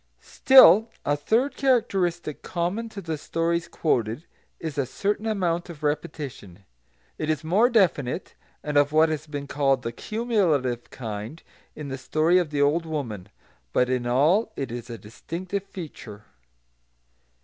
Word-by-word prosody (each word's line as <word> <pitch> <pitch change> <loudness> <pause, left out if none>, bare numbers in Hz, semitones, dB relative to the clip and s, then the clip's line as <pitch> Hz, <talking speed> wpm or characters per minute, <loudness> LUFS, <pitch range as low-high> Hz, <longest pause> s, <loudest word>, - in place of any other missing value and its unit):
Still 230 - +6 0.2
a 145 - +2
third 235 - 0
characteristic 185 - 0
common 185 +7 -3
to 205 -2 -8
the 160 -4 -4
stories 170 +2 -1
quoted 120 -3 -1 0.3
is 155 -3 -4
a 135 - 0
certain 205 - -2
amount 175 -6 -1
of 160 -3 -10
repetition. 140 - -4 0.5
It 155 - -2
is 155 +1 0
more 200 +10 +3
definite, 180 - +1 0.3
and 150 -1 -1
of 145 0 +4
what 155 +1 +4
has 155 0 -4
been 145 -1 -5
called 135 -2 +1
the 115 - -3
"cumulative" 165 - -1
kind, 110 +5 -7 0.3
in 150 -2 -7
the 135 0 -5
story 160 +6 +2
of 175 -4 -1
the 145 -1 +1
old 165 +4 +1
woman; 115 - -5 0.4
but 125 0 +2
in 125 -1 -1
all 155 - +3
it 135 -4 -4
is 120 +1 -7
a 115 - -6
distinctive 175 - -6
feature. 130 - -10
155 Hz, 150 wpm, -25 LUFS, 135-180 Hz, 0.5 s, Still